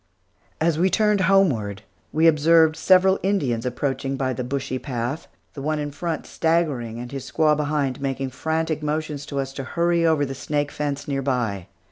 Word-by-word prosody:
As 160 -1 +1
we 185 +2 +3
turned 210 0 +2
homeward, 140 - +2 0.3
we 160 +2 +2
observed 160 0 +5
several 190 +3 +4
Indians 135 - 0
approaching 135 +1 -2
by 130 -1 -1
the 125 - -4
bushy 130 0 -3
path, 125 +3 -4 0.3
the 140 - -7
one 155 +2 -1
in 145 -1 -3
front 165 +2 -4
staggering, 150 -9 0
and 120 0 -7
his 135 -2 -6
squaw 155 -1 +3
behind, 145 -3 -1
making 135 -1 -2
frantic 160 +3 -2
motions 150 -1 -3
to 140 - -3
us 135 0 -3
to 135 - -5
hurry 170 +4 +1
over 160 -3 +3
the 135 - -5
snake 145 +2 -2
fence 145 -1 -3
near 135 -1 -1
by. 120 -9 -1
145 Hz, 175 wpm, -23 LUFS, 130-160 Hz, 0.3 s, observed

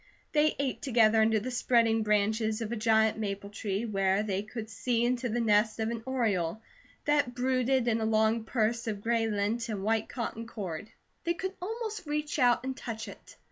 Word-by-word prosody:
They 305 0 +3
ate 275 -2 -2
together 225 -4 +4
under 220 0 +3
the 250 +5 -5
spreading 230 -2 +3
branches 215 +1 +1
of 225 -1 -4
a - - -1
giant 220 -1 +3
maple 200 -1 -4
tree, 205 +1 -2
where 195 -2 +1
they 195 -2 -1
could 220 +1 -7
see 235 +1 0
into 245 0 0
the 235 +2 -1
nest 215 -1 +2
of 220 +1 0
an 230 -1 -4
oriole 215 -8 0 0.5
that 290 -4 +2
brooded 255 0 +1
in 225 -1 +1
a - - 0
long 220 +1 +2
purse 230 +1 0
of 205 -2 -3
gray 230 0 +1
lint 220 +3 -1
and 205 -3 -3
white 220 +1 0
cotton 230 -2 -4
cord. 200 -4 -6 0.3
They 340 0 0
could 375 +2 -4
almost 435 -1 -4
reach 300 0 -2
out 245 -1 +4
and 265 0 -3
touch 225 -3 -6
it. - - -12
225 Hz, 190 wpm, -30 LUFS, 215-245 Hz, 0.5 s, together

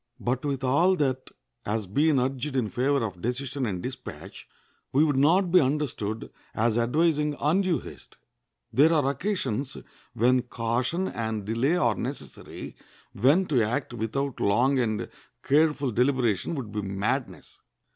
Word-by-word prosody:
But 125 +1 -1
with 140 -2 -2
all 165 +9 +3
that 130 -5 -1 0.3
has 105 0 -2
been 145 - +2
urged 130 +2 -2
in 115 -6 0
favor 130 +3 +1
of 90 -5 -7
decision 130 +3 -2
and 90 -4 -4
dispatch, 130 +1 -8 0.4
we 140 +4 +4
would 150 -3 +2
not 170 +7 +3
be 180 - +7
understood 130 -6 -2 0.2
as 115 0 +1
advising 150 +5 +1
undue 175 +3 +2
haste. - - -13 0.6
There 150 +5 +5
are 150 -5 +2
occasions 140 - -3 0.4
when 125 +3 +3
caution 125 +9 -1
and 110 -3 -3
delay 120 - +1
are 120 -9 +2
necessary, - - -7 0.4
when 140 - +3
to 135 -8 +2
act 120 +4 -1
without 125 +4 -3
long 125 +7 +2
and 110 -4 -1 0.4
careful 145 -2 +2
deliberation 125 - +1
would 125 -8 -5
be 105 0 -2
madness. 100 +1 -3
130 Hz, 140 wpm, -26 LUFS, 115-150 Hz, 0.6 s, be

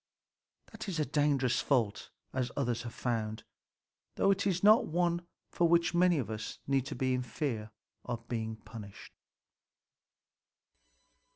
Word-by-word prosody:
That - - -6
is 170 -4 -2
a 150 - +2
dangerous 140 -3 +2
fault, 115 -7 0 0.2
as 130 -2 0
others 120 -4 0
have 120 -1 -7
found; 110 -3 -2 0.7
though 195 - +4
it 200 +1 +1
is 185 -1 0
not 215 +3 +7
one 175 +1 0 0.2
for 170 - +3
which 170 0 +4
many 175 -1 +4
of 115 -6 -2
us 110 0 -5
need 135 -1 +1 0.4
fear 115 -3 -3 0.6
being 110 -2 -3
punished. 110 -3 -11
135 Hz, 120 wpm, -32 LUFS, 115-170 Hz, 0.7 s, not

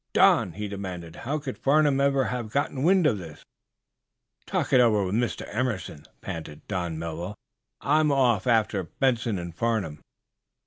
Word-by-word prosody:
"Don," 90 - +4
he 105 +3 -4
demanded, 95 -4 -6
"how 145 +5 -2
could 140 -3 -6
Farnum 145 -1 +3
ever 140 -1 +3
have 125 -3 -3
gotten 140 +2 -1
wind 180 +3 +4
of 115 -9 +2
this?" 80 -4 -11 1.0
"Talk - - -1
it 130 - +7
over 105 -4 +3
with 95 - -3
Mr. 120 +2 -1
Emerson," 110 - -2 0.2
panted 80 -2 -7
Don 90 -5 -3
Melville. 85 +4 -5 0.5
"I'm 150 +4 +3
off 125 -8 +2
after 110 -4 +2
Benson 120 +1 0
and 85 -1 -6
Farnum." 105 -6 -1
110 Hz, 150 wpm, -26 LUFS, 90-135 Hz, 1.0 s, it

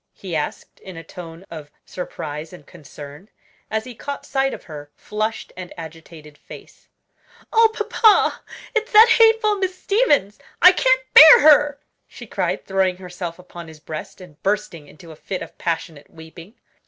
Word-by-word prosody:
he 185 -4 -7
asked 150 - -5
in 185 -3 -12
a 165 - -9
tone 165 +2 -12
of 155 -3 -9 0.2
surprise 155 -3 -7
and 180 -5 -14
concern, 145 +3 -13 0.4
as 220 0 -2
he 255 - -10
caught 280 +5 -8
sight 270 0 -1
of - - -9
her 145 -2 -11
flushed 215 +1 -5
and 185 -1 -9
agitated 160 -2 -12
face. - - -15 0.7
"Oh, 450 0 +5
papa, 445 0 +2 0.3
it's 445 +1 -2
that 440 +2 +8
hateful 445 -2 +4
Miss 375 -1 -3
Stevens; 330 - 0 0.2
I 360 - +8
can't 260 -7 +2
bear 315 +1 +10
her!" 290 -1 +4 0.3
she - - -12
cried, - - -3
throwing 190 -2 0
herself 175 -2 -8
upon 175 -2 -12
his 160 -1 -14
breast, 155 +4 -9
and 175 -5 -16
bursting 195 -7 -3
into 165 +3 -15
a - - -12
fit 185 +4 -6
of - - -13
passionate 160 -3 -5
weeping. 165 +6 -14
185 Hz, 160 wpm, -20 LUFS, -, 0.7 s, bear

